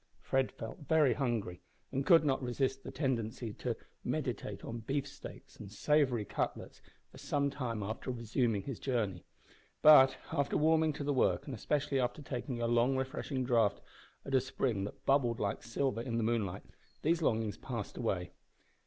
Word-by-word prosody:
Fred 135 -1 0
felt 115 - -8
very 155 -6 +5
hungry, 115 -10 -2 0.3
and 135 - -1
could 165 -3 +7
not 135 -2 +1
resist 135 +2 -1
the - - -6
tendency 115 -5 -2
to - - -3 0.3
meditate - - -3
on 115 +1 -5
beefsteaks 135 +5 -5
and 100 -2 -9
savoury 130 -1 +2
cutlets - - -4 0.3
for - - -13
some 140 -1 0
time 120 -6 -3
after 110 +5 -5
resuming 115 -3 0
his 135 -5 -5
journey; 105 -9 -1 0.6
but, 135 -4 +8
after 140 -4 +1
warming 160 0 +4
to 145 - -5
the 145 0 0
work, 130 - +2
and 140 - -6
especially 140 +3 0
after 125 +4 -1
taking 125 -2 -4
a 120 - 0
long 120 +3 +3
refreshing 130 0 -2
draught 115 -5 +3 0.5
at 135 - -5
a 130 - +5
spring 120 -6 -1
that 105 - -9
bubbled 125 -4 +3
like 100 0 -1
silver 120 +1 -1
in 115 -1 -2
the 115 - +1
moonlight, 110 -5 -1 0.4
these 165 +2 +2
longings 110 -7 0
passed 115 -5 -5
away. 90 -6 -2
125 Hz, 165 wpm, -33 LUFS, 115-140 Hz, 0.6 s, but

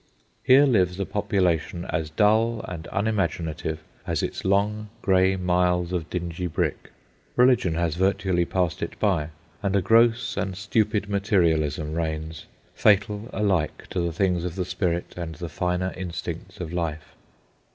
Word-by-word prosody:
Here 135 +3 +6
lives 95 -8 +2
a 100 - 0
population 90 -5 0
as 80 -3 -1
dull 110 +6 +2
and 80 -3 -6
unimaginative 85 -6 -1 0.2
as - - -1
its - - -3
long 105 +2 +1
grey 95 0 +4
miles 90 -1 +1
of 85 -2 -2
dingy 85 0 -3
brick. 80 - -2 0.5
Religion 125 -9 +4
has 85 -1 0
virtually 95 0 +1
passed 90 -1 -1
it - - -5
by, 90 -8 +1 0.3
and 100 -2 0
a 100 - +3
gross 115 +4 +3
and 95 -2 -2
stupid 105 +1 0
materialism 80 -7 +1
reigns, 80 -1 -4 0.3
fatal 105 +2 +2
alike 95 -6 0
to 95 - -1
the 85 -1 0
things 90 0 0
of 90 -1 -4
the 95 -2 -2
spirit 90 -1 -2
and 85 -2 -5
the 85 +2 -6
finer 90 +1 -1
instincts 90 -2 -6
of 85 -1 -5
life. 80 -3 -3
90 Hz, 145 wpm, -25 LUFS, 85-100 Hz, 0.5 s, Here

